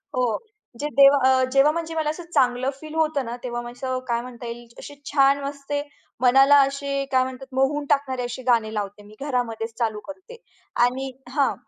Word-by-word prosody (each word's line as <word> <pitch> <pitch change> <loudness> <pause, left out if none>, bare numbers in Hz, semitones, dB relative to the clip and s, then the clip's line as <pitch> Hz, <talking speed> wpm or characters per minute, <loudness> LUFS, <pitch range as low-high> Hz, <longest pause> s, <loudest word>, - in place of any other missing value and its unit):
हो. 255 - +1 0.6
जे 295 - -1
देवा 275 0 +8
अ, 260 0 +4
जेव्हा 275 +2 +5
म्हणजे 330 0 -4
मला 310 -1 0
असं 340 +3 -5
चांगलं 250 +1 +2
फील 310 0 -10
होतं 310 -4 +1
ना, 230 +1 -5
तेव्हा 240 -1 -3
असं 255 +1 -3
काय 235 -1 0
म्हणता 245 0 -10
येईल 235 0 -8
अशी 290 - -10 0.2
छान 275 0 +4
वाजते 285 +1 -3 0.4
मनाला, 270 +3 +6
अशे 275 0 -1
काय 255 -1 +4
म्हणतात, 260 +1 -7
मोहून 280 +2 +1
टाकणारे 265 -3 +1
असे 245 +1 -6
गाणे 220 -2 +1
लावते 205 0 -4
मी, 210 +1 -15
घरामध्येच 235 -5 -2
चालू 220 -2 -1
करते 380 +11 -10 0.5
आणि 265 +2 -2 0.2
हां. 275 0 +1
265 Hz, 180 wpm, -23 LUFS, 245-285 Hz, 0.6 s, देवा